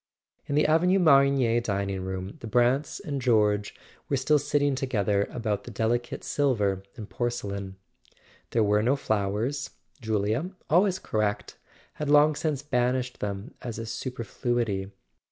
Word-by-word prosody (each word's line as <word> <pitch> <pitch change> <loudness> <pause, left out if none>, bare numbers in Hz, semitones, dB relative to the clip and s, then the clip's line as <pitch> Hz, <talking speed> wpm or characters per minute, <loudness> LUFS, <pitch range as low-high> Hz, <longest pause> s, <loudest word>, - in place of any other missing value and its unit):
In 140 - -1
the 150 - +4
Avenue 175 +5 +4
Marigny 140 -8 +4
dining 100 -3 -2
room 95 +1 -5
the 115 - -7
Brants 125 +5 +1
and 140 -3 -4
George 105 -4 +2 0.3
were 140 - +1
still 150 +3 +3
sitting 145 0 +1
together 105 -7 0
about 110 -4 -2
the - - -7
deli¬ 115 +2 0
cate 120 - -8
silver 105 -9 +1
and 110 -5 -8
porcelain. 100 -6 -3 0.7
There 115 - +2
were 105 0 +3
no 125 +6 +2
flowers: 110 +3 -1 0.3
Julia, 110 - 0 0.2
always 185 +3 +4
correct, 105 - -2 0.4
had 150 - -1
long 150 +1 +6
since 150 -2 -2
banished 125 -2 0
them 100 +6 -4
as 120 -4 -5
a 115 - -4
super¬ 115 +1 -5
fluity. 110 -6 -1
120 Hz, 145 wpm, -27 LUFS, 105-140 Hz, 0.7 s, long